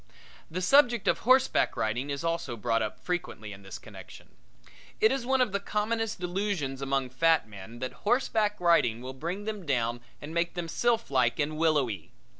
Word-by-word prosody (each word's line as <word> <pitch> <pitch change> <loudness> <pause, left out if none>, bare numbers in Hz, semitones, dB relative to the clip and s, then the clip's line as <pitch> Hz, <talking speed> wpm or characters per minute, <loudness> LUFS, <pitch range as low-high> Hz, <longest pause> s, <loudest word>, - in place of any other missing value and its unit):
The 185 +3 -3
subject 240 -2 +4
of - - +3
horseback 260 +2 +3
riding 120 +6 -1
is 140 +2 -3
also 165 -7 -2
brought 115 +1 0
up 110 -1 -3
frequently 165 - -3
in 95 - -12
this 95 -1 -8
connection. - - -13 0.7
It 220 - +5
is 265 -2 -2
one 265 0 +3
of 250 - +2
the 200 - 0
commonest 215 +1 -1
delusions 180 -7 -2
among 135 -2 -1
fat 160 -1 +3
men 105 +2 -10
that 130 +1 -4
horseback 215 -2 +1
riding 165 -10 +3
will 130 +1 -6
bring 170 +9 -4
them 210 -2 -4
down 120 -5 0 0.2
and 150 +2 -8
make 170 +1 0
them 175 -1 -3
sylphlike 155 - +1
and 155 +1 -1
willowy. 145 - 0
165 Hz, 175 wpm, -29 LUFS, 125-210 Hz, 0.7 s, It